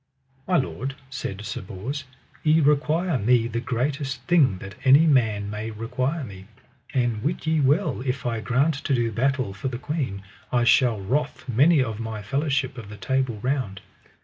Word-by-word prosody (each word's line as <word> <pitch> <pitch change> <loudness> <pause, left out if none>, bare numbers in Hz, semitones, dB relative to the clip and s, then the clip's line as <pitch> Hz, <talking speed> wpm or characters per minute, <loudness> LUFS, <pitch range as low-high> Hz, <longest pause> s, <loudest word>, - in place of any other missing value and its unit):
My 180 -1 +3
lord, 135 -1 -2 0.2
said 100 -5 -5
Sir - - -4
Bors, 115 +10 -5 0.4
ye 155 +1 +4
require 150 +2 +2
me 115 +2 +3
the 115 0 -2
greatest 135 +2 -2
thing 135 - +4
that 95 +2 -9
any 140 +4 +7
man 110 -9 +2
may 105 +2 -4
require 125 +8 -2
me; 95 -5 -10 0.4
and 120 -4 0
wit 155 +7 -2
ye 160 0 +2
well 145 +1 +2
if 130 -1 -2
I 115 -2 -1
grant 130 +8 +2
to 140 - +2
do 120 -2 0
battle 130 -2 0
for 100 +6 -4
the 125 -2 -3
queen 130 -8 -3 0.3
I 120 -1 +3
shall 120 -1 +4
wrath 135 +11 -2
many 140 +5 +4
of 115 -3 -5
my 110 -2 -5
fellowship 135 0 -1
of 105 -3 -10
the 105 - -9
Table 130 +3 -1
Round. 125 -7 -1
130 Hz, 175 wpm, -24 LUFS, 110-140 Hz, 0.4 s, any